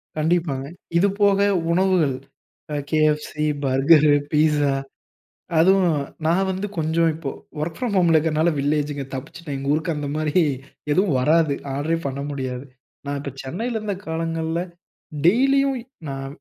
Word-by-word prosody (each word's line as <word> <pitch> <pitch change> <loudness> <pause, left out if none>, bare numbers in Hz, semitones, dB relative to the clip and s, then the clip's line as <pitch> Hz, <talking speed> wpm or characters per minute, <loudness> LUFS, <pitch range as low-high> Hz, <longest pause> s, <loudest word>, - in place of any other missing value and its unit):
கண்டிப்பாங்க. 155 -4 0 0.3
இது 195 +4 +4
போக 200 -1 +4 0.3
உணவுகள், 180 -7 +2 0.6
அ - - -1 0.2
KFC, 155 -1 +2 0.3
பர்கரு, 145 +3 +5 0.2
பீஸ்ஸா, 150 -2 +3 0.9
அதுவும் 180 -2 +4 0.3
நான் 180 +4 +2
வந்து 190 +3 -3
கொஞ்சம் 165 +1 +2
இப்போ 150 -4 -5 0.3
ஒர்க் 160 +1 -3
ஃப்ரம் 240 -5 -2
ஹோம்ல 170 -3 +4
இருக்கறனால 155 +1 +2
வில்லேஜ்ங்க 145 0 -1
தப்பிச்சுட்டேன். 145 +3 -6
எங்க 140 +1 -1
ஊருக்கு 160 +2 0
அந்த 145 -1 -3
மாரி 155 -1 -1 0.6
எதுவும் 180 -2 +2
வராது. 155 +2 +3 0.2
ஆடரே 155 +4 0
பண்ண 140 +1 -4
முடியாது. 130 -1 -4 0.4
நான் 140 0 -2
இப்போ 140 -1 -5
சென்னையில 225 - -3
இருந்த 205 -2 -3
காலங்கள்ல, 165 0 -2 0.6
டெய்லியும் 270 +7 +4 0.3
நான் 135 0 -5
160 Hz, 130 wpm, -22 LUFS, 145-175 Hz, 0.9 s, பர்கரு